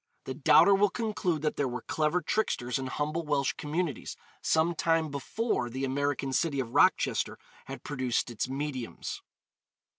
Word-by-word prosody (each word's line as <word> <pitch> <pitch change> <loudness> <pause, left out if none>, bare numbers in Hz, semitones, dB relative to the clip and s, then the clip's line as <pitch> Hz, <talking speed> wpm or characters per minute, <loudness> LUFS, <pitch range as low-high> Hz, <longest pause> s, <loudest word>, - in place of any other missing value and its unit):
The 130 - -4
doubter 160 +8 +6
will 200 +1 +4
conclude 205 - -1
that 150 - 0
there 140 - +1
were 125 -1 -5
clever 155 +3 0
tricksters 125 - 0
in 130 - -3
humble 150 +5 -2
Welsh 145 -3 +1
communities 150 -2 -3 0.2
some 160 +2 +2
time 165 -2 +1
before 140 - -1
the 130 +3 -3
American 135 0 -1
city 145 -1 +1
of 120 -3 -3
Rochester - - +3 0.3
had - - -8
produced 130 -4 -1
its 120 +2 -3
'mediums.' 135 -3 -4
145 Hz, 150 wpm, -29 LUFS, 130-165 Hz, 0.3 s, doubter